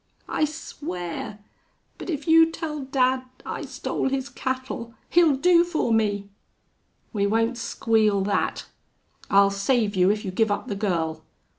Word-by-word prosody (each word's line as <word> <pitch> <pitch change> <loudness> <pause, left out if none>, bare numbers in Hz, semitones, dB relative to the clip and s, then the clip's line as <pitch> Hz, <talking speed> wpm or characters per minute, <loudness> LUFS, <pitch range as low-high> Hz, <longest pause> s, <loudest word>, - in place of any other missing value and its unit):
"I 305 - +1
swear!... 210 - -6 0.6
But - - -7
if 300 -3 -3
you 325 0 +7
tell 315 -2 -4
dad 260 -1 +2 0.2
I - - -4
stole - - -2
his 270 0 -2
cattle 260 -3 -4 0.2
he'll 330 -4 +5
do 340 +4 +5
for 325 -9 0
me!" 205 -2 +1 0.9
"We 200 -2 +1
won't 225 +3 +1
squeal 220 -3 +1
that. 200 +1 -1 0.6
I'll 200 0 +5
save 205 +1 +1
you 185 0 +4
if 210 +1 0
you 190 - -3
give 220 +4 +2
up 205 - -2
the 205 - -2
girl. 170 -6 -1
230 Hz, 145 wpm, -25 LUFS, 200-275 Hz, 0.9 s, you